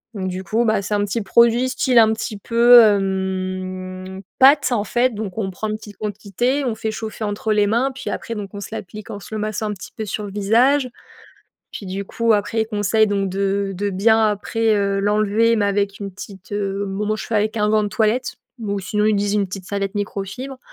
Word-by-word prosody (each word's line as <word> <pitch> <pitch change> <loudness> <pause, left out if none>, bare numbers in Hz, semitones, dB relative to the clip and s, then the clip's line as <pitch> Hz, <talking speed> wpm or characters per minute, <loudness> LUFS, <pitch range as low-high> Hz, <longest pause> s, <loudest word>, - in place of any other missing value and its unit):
donc 190 -2 -3
du 185 0 -4
coup, 225 +4 0
bah, 220 -3 +1
c'est 205 - -3
un 205 0 +1
petit 210 +2 -2
produit, 235 +5 +4
style 255 -1 +1
un 220 -1 +6
petit 220 -1 -5
peu, 235 +3 +6
hem, 185 -2 -2 0.2
pâte 280 +1 +6
en 225 -4 +1
fait, 240 +3 +1
donc 205 -1 -5
on 195 -3 -1
prend 205 +4 -4
en - - -1
petite 210 -2 -11
quantité, 215 +6 -2
on 235 -3 -1
fait 220 0 -3
chauffer 220 0 -6
entre 210 +1 -2
les 210 -1 +3
mains, 235 +6 +1
puis - - -5
après, 230 - -5
donc 205 -2 -6
on 205 - -6
se 195 - -6
l'applique 215 -1 -8
en 200 - -6
se 205 - -11
le 215 - -2
massant 215 0 -2
un - - -2
petit 195 - -10
peu 220 - -3
sur 210 +1 -4
le 200 - -7
visage, 240 +8 +3 0.8
puis 200 - -8
du 195 +2 -4
coup 230 +3 +1
après, 210 +2 0
ils 220 - -2
conseillent 215 0 +2
donc 200 -1 0
de 195 +1 -1
de 200 +2 -2
bien, 220 +4 +3
après, 220 +2 0
heu, 200 -1 0
l'enlever 210 +3 +2
mais 210 -2 +1
avec 200 0 0
une 200 -1 -5
petite, 190 0 -11
heu 200 -1 -2
bon 200 +2 -3
moi, 215 - +1
je - - -6
fais - - -6
avec 215 +2 0
un 210 0 +2
gant 215 0 +3
de - - -1
toilette 220 +4 0 0.2
ou 205 -3 -2
sinon, 210 +2 -1
ils 215 -1 +3
disent: 200 0 0
«une 205 -2 +1
petite 185 0 -7
serviette 200 0 -3
microfibre». 205 +6 -4
210 Hz, 230 wpm, -20 LUFS, 195-220 Hz, 0.8 s, un